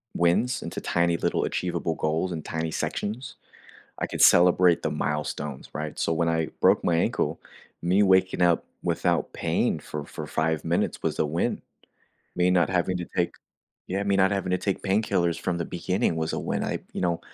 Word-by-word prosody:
wins, 110 Hz, +9 st, +2 dB
into 85 Hz, -, -5 dB
tiny, 85 Hz, -1 st, +1 dB
little, -, -, 0 dB
achievable 85 Hz, -2 st, -2 dB
goals 80 Hz, +5 st, -1 dB
in 80 Hz, -2 st, -4 dB
tiny 80 Hz, 0 st, -3 dB
sections, 110 Hz, +10 st, -3 dB, 0.6 s
I -, -, -1 dB
could -, -, -3 dB
celebrate 90 Hz, 0 st, +6 dB
the 80 Hz, -, 0 dB
milestones, 75 Hz, -1 st, -3 dB
right? 75 Hz, 0 st, -5 dB
So, 80 Hz, -, 0 dB
when 85 Hz, +1 st, +1 dB
I 80 Hz, -1 st, 0 dB
broke -, -, +4 dB
my 85 Hz, -, +2 dB
ankle, 85 Hz, -, 0 dB, 0.4 s
me 90 Hz, +4 st, +3 dB
waking 95 Hz, -1 st, +3 dB
up 85 Hz, -1 st, +3 dB, 0.2 s
without -, -, 0 dB
pain -, -, 0 dB
for 75 Hz, -1 st, -6 dB
for 75 Hz, -, -7 dB
5 80 Hz, 0 st, 0 dB
minutes 85 Hz, +1 st, 0 dB
was -, -, -1 dB
a -, -, +3 dB
win. 80 Hz, +3 st, -1 dB, 0.8 s
Me 90 Hz, +1 st, +3 dB
not 90 Hz, -1 st, +3 dB
having 90 Hz, 0 st, +1 dB
to 90 Hz, -1 st, -4 dB
take 85 Hz, -, +1 dB, 0.5 s
yeah, 95 Hz, +2 st, -1 dB
me 100 Hz, -1 st, +1 dB
not 95 Hz, 0 st, +4 dB
having 95 Hz, -2 st, -1 dB
to 90 Hz, -, +1 dB
take 100 Hz, 0 st, -2 dB
painkillers 95 Hz, -4 st, +1 dB
from 90 Hz, -2 st, -1 dB
the 85 Hz, -, -2 dB
beginning 90 Hz, 0 st, -1 dB
was 80 Hz, 0 st, -1 dB
a -, -, -2 dB
win. -, -, -2 dB
I, -, -, -2 dB
you -, -, -4 dB
know 85 Hz, -2 st, 0 dB
85 Hz, 185 wpm, -26 LUFS, 80-95 Hz, 0.8 s, celebrate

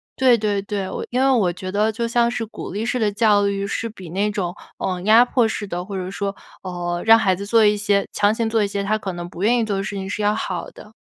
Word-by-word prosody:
对 255 Hz, -3 st, +4 dB
对 205 Hz, -2 st, 0 dB
对， 200 Hz, -1 st, -4 dB
我 -, -, -5 dB
因 250 Hz, +2 st, 0 dB
为 270 Hz, -, +4 dB
我 220 Hz, -9 st, +3 dB
觉 185 Hz, +1 st, -6 dB
得 210 Hz, +3 st, +1 dB
就 230 Hz, +2 st, -2 dB
像 235 Hz, 0 st, +2 dB
是 235 Hz, -1 st, -3 dB
鼓 220 Hz, -, -8 dB
励 210 Hz, +4 st, -3 dB
式 250 Hz, +1 st, -1 dB
的 215 Hz, -2 st, +1 dB
教 205 Hz, -1 st, +3 dB
育， 200 Hz, 0 st, -1 dB
是 225 Hz, +3 st, -3 dB
比 190 Hz, -6 st, -11 dB
那 200 Hz, +5 st, 0 dB
种， 185 Hz, -4 st, -3 dB, 0.2 s
嗯， 180 Hz, -1 st, -3 dB
压 220 Hz, +3 st, +7 dB
迫 245 Hz, -2 st, +2 dB
式 220 Hz, -1 st, -4 dB
的， 175 Hz, -1 st, -4 dB
或 200 Hz, 0 st, -7 dB
者 185 Hz, 0 st, -4 dB
说， 200 Hz, 0 st, -3 dB, 0.3 s
呃， 175 Hz, -1 st, -3 dB
让 225 Hz, 0 st, +8 dB
孩 190 Hz, -4 st, +2 dB
子 200 Hz, +2 st, -6 dB
做 225 Hz, +1 st, +4 dB
一 210 Hz, 0 st, +4 dB
些 200 Hz, -1 st, +1 dB
强 205 Hz, +1 st, +3 dB
行 225 Hz, 0 st, -1 dB
做 220 Hz, -1 st, +2 dB
一 -, -, 0 dB
些 200 Hz, 0 st, -3 dB
他 215 Hz, +2 st, +1 dB
可 195 Hz, -3 st, -5 dB
能 175 Hz, 0 st, -6 dB
不 175 Hz, -, -9 dB
愿 240 Hz, +3 st, +4 dB
意 -, -, +1 dB
做 205 Hz, -2 st, -2 dB
的 195 Hz, -, -2 dB
事 200 Hz, +1 st, -5 dB
情 190 Hz, 0 st, -5 dB
是 205 Hz, -, -3 dB
要 210 Hz, 0 st, +2 dB
好 185 Hz, -5 st, -4 dB
的。 215 Hz, -, -15 dB
205 Hz, 305 characters per minute, -21 LUFS, 195-220 Hz, 0.3 s, 让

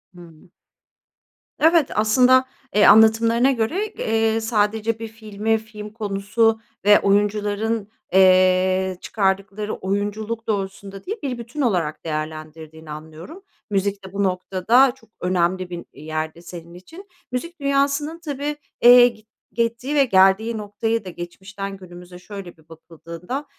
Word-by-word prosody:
Hı. 170 Hz, -1 st, -16 dB, 1.1 s
Evet. 320 Hz, -2 st, +4 dB
Aslında, 250 Hz, +5 st, +4 dB, 0.3 s
eee, 210 Hz, -, +5 dB
anlatımlarına 225 Hz, +4 st, +5 dB
göre, 270 Hz, -, -1 dB
eee, 225 Hz, -, 0 dB
sadece 220 Hz, 0 st, 0 dB
bir 225 Hz, -, -5 dB
filmi, 220 Hz, 0 st, -2 dB
film 215 Hz, -1 st, -10 dB
konusu 220 Hz, +1 st, 0 dB, 0.3 s
ve 205 Hz, 0 st, +7 dB
oyuncuların, 205 Hz, +1 st, 0 dB, 0.2 s
eee, 185 Hz, 0 st, +4 dB
çıkardıkları 200 Hz, +1 st, -2 dB
oyunculuk 210 Hz, +3 st, -3 dB
doğrultusunda 195 Hz, -1 st, -4 dB
değil, 425 Hz, +4 st, -4 dB
bir 260 Hz, -3 st, -3 dB
bütün 235 Hz, +5 st, -6 dB
olarak 175 Hz, -, -1 dB
değerlendirdiğini 155 Hz, 0 st, -6 dB
anlıyorum. 160 Hz, -, -10 dB, 0.3 s
Müzik 200 Hz, -1 st, -1 dB
de 190 Hz, -, -11 dB
bu 200 Hz, 0 st, -1 dB
noktada 195 Hz, +7 st, +2 dB
çok 225 Hz, -5 st, -24 dB
önemli 180 Hz, 0 st, 0 dB
bir 175 Hz, -1 st, -7 dB
yerde 155 Hz, +2 st, -5 dB
senin 170 Hz, -1 st, -11 dB
için. 325 Hz, -, -13 dB, 0.2 s
Müzik 335 Hz, +8 st, -5 dB
dünyasının 280 Hz, +3 st, 0 dB
tabii, 295 Hz, -2 st, -4 dB, 0.3 s
eee, 245 Hz, 0 st, +9 dB
gi 215 Hz, -3 st, -9 dB, 0.3 s
gittiği 235 Hz, +4 st, -2 dB
ve 280 Hz, -2 st, +5 dB
geldiği 195 Hz, +2 st, +3 dB
noktaya 210 Hz, +1 st, -3 dB
da -, -, -6 dB
geçmişten 195 Hz, +3 st, -8 dB
günümüze 180 Hz, -1 st, -12 dB
şöyle 185 Hz, -1 st, -10 dB
bir 160 Hz, 0 st, -25 dB
bakıldığında 170 Hz, -, -8 dB
205 Hz, 125 wpm, -21 LUFS, 185-230 Hz, 1.1 s, eee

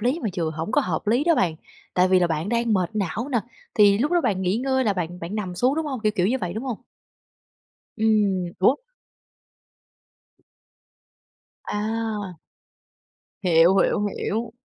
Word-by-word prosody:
lý 255 Hz, +9 st, 0 dB
mà 220 Hz, -, 0 dB
vừa 165 Hz, -2 st, 0 dB
hổng 160 Hz, +5 st, -5 dB
có 295 Hz, -, +4 dB
hợp 265 Hz, -, -3 dB
lý 240 Hz, +8 st, +2 dB
đó 340 Hz, -, +4 dB
bạn, 175 Hz, -, +1 dB, 0.4 s
tại 180 Hz, +1 st, +4 dB
vì 185 Hz, 0 st, +5 dB
là 175 Hz, -, +3 dB
bạn 160 Hz, +2 st, -2 dB
đang 235 Hz, 0 st, +1 dB
mệt 185 Hz, -4 st, +1 dB
não 210 Hz, -, -2 dB
nè, 240 Hz, -, +3 dB, 0.4 s
thì 205 Hz, -2 st, +5 dB
lúc 290 Hz, +8 st, 0 dB
đó 350 Hz, -, +4 dB
bạn 190 Hz, -, 0 dB
nghỉ 185 Hz, +3 st, +1 dB
ngơi 260 Hz, +1 st, 0 dB
là 210 Hz, -, +2 dB
bạn 180 Hz, -1 st, -4 dB
bạn 170 Hz, +5 st, -5 dB
nằm 190 Hz, -4 st, -3 dB
xuống, 250 Hz, +9 st, +2 dB
đúng 320 Hz, 0 st, -2 dB
hông? 265 Hz, -5 st, -4 dB
Kiểu 215 Hz, -1 st, +1 dB
kiểu 180 Hz, -3 st, +2 dB
như 255 Hz, +6 st, +1 dB
vậy, 180 Hz, -7 st, -3 dB
đúng 220 Hz, +4 st, -4 dB
hông? 250 Hz, -5 st, -3 dB, 1.2 s
Ừm, 205 Hz, -5 st, +1 dB
ủa? 245 Hz, +9 st, +4 dB, 2.9 s
A. 210 Hz, -3 st, -3 dB, 1.1 s
Hiểu, 175 Hz, +1 st, +5 dB
hiểu, 205 Hz, +1 st, +2 dB
hiểu. 225 Hz, +2 st, -2 dB
210 Hz, 170 wpm, -24 LUFS, 180-235 Hz, 2.9 s, vì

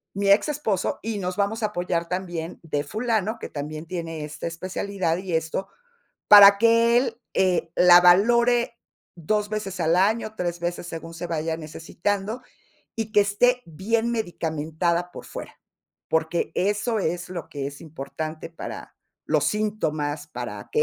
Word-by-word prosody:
mi 200 Hz, 0 st, 0 dB
ex 200 Hz, +9 st, +5 dB
esposo, 220 Hz, -11 st, -1 dB
y 220 Hz, -1 st, -3 dB
nos 180 Hz, 0 st, -3 dB
vamos 210 Hz, +3 st, 0 dB
a -, -, +3 dB
apoyar 175 Hz, -4 st, -2 dB
también 175 Hz, -2 st, -4 dB
de 145 Hz, -3 st, -2 dB
fulano, 220 Hz, -, -1 dB
que -, -, -6 dB
también 155 Hz, +2 st, -6 dB
tiene 165 Hz, -3 st, -5 dB
esta 150 Hz, +1 st, -8 dB
especialidad 185 Hz, +1 st, -2 dB
y 185 Hz, -1 st, -5 dB
esto, 160 Hz, +4 st, -2 dB, 0.6 s
para 200 Hz, -1 st, +10 dB
que 230 Hz, +2 st, +4 dB
él, 240 Hz, -1 st, -1 dB
eh, 180 Hz, -3 st, +1 dB
la 175 Hz, 0 st, +8 dB
valore 235 Hz, +6 st, +4 dB, 0.4 s
2 210 Hz, +5 st, -1 dB
veces 195 Hz, -3 st, -4 dB
al 165 Hz, 0 st, +2 dB
año, 215 Hz, +4 st, +1 dB
3 175 Hz, -3 st, -3 dB
veces 175 Hz, 0 st, -3 dB
según 165 Hz, 0 st, -7 dB
se 170 Hz, +1 st, -6 dB
vaya 160 Hz, -1 st, -2 dB
necesitando, 195 Hz, +8 st, -3 dB, 0.5 s
y 225 Hz, -2 st, -3 dB
que 210 Hz, -, +6 dB
esté 245 Hz, +5 st, +2 dB
bien 225 Hz, +8 st, -1 dB
medicamentada 170 Hz, -3 st, -1 dB
por -, -, -9 dB
fuera. -, -, -9 dB, 0.5 s
Porque, 160 Hz, +1 st, 0 dB
eso 210 Hz, +4 st, 0 dB
es 175 Hz, 0 st, -2 dB
lo 180 Hz, -3 st, -6 dB
que 140 Hz, -2 st, -4 dB
es 140 Hz, 0 st, -8 dB
importante 155 Hz, +1 st, -6 dB
para 165 Hz, -, -8 dB, 0.3 s
los 150 Hz, -2 st, +2 dB
síntomas, 155 Hz, -6 st, -1 dB
para -, -, -7 dB
que 455 Hz, -, +2 dB
180 Hz, 155 wpm, -24 LUFS, 165-215 Hz, 0.6 s, para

